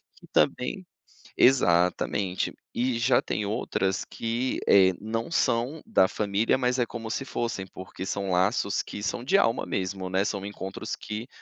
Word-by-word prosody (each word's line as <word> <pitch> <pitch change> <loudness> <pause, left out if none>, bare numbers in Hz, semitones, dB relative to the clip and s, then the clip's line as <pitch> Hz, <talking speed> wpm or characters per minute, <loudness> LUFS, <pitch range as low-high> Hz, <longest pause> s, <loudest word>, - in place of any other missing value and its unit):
que - - -17
também - - +1 0.5
exatamente. 90 -4 +3 0.2
E 125 0 0
já 125 +3 +4
tem 105 - -2
outras 100 -3 -1
que, 120 +3 -2
eh, 95 -2 +6
não 115 +4 -3
são 125 +3 +1
da 215 - +4
família, 105 +4 +1
mas 125 0 +1
é 120 - +3
como 115 -2 -7
se 135 - -2
fossem, 115 -7 -3
porque 95 0 -8
são 100 0 -2
laços 95 +2 +2
que 105 - -7
são 120 - -2
de 195 +9 +4
alma 115 -12 +2
mesmo, 95 0 -3
né, 95 +1 +1
são 100 -2 -3
encontros 95 -1 -5
que 110 +3 -6
105 Hz, 160 wpm, -27 LUFS, 95-120 Hz, 0.5 s, eh